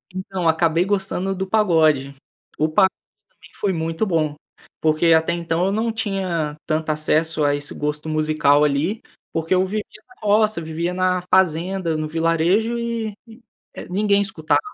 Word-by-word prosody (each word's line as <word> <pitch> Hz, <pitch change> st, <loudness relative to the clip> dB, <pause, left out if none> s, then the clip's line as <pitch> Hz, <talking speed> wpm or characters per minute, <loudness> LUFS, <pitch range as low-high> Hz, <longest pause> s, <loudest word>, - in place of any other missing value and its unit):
Então 185 Hz, -1 st, -4 dB
eu 165 Hz, -, +4 dB
acabei 165 Hz, +1 st, +2 dB
gostando 195 Hz, -1 st, -1 dB
do 190 Hz, +1 st, -3 dB
pagode. 160 Hz, -9 st, +2 dB, 0.4 s
O 155 Hz, -, +2 dB
pagode 190 Hz, +4 st, +4 dB, 0.4 s
pra -, -, -41 dB
mim -, -, -15 dB
foi 200 Hz, -2 st, 0 dB
muito 165 Hz, +3 st, -2 dB
bom, 160 Hz, -5 st, 0 dB, 0.5 s
porque 160 Hz, +1 st, +3 dB
até 160 Hz, 0 st, +3 dB
então 170 Hz, +1 st, -1 dB
eu 195 Hz, -, 0 dB
não 225 Hz, +2 st, 0 dB
tinha 185 Hz, -8 st, -2 dB
tanto 155 Hz, 0 st, -1 dB
acesso 155 Hz, +1 st, +1 dB
a 145 Hz, 0 st, +3 dB
esse 145 Hz, 0 st, -5 dB
gosto 150 Hz, +1 st, -3 dB
musical 155 Hz, -2 st, +3 dB
ali, 150 Hz, +9 st, 0 dB, 0.3 s
porque 165 Hz, +2 st, 0 dB
eu 185 Hz, 0 st, +3 dB
vivia 210 Hz, +2 st, -3 dB, 0.2 s
na -, -, -19 dB
roça, 210 Hz, -2 st, +3 dB
eu -, -, -7 dB
vivia 165 Hz, +3 st, -3 dB
na 185 Hz, 0 st, +1 dB
fazenda, 180 Hz, -1 st, +2 dB
no 155 Hz, 0 st, -2 dB
vilarejo 165 Hz, +8 st, +1 dB
e, 230 Hz, -2 st, -3 dB, 0.6 s
é -, -, -9 dB
ninguém 200 Hz, +2 st, +2 dB
escutava. 165 Hz, -6 st, 0 dB
170 Hz, 165 wpm, -21 LUFS, 155-195 Hz, 0.6 s, eu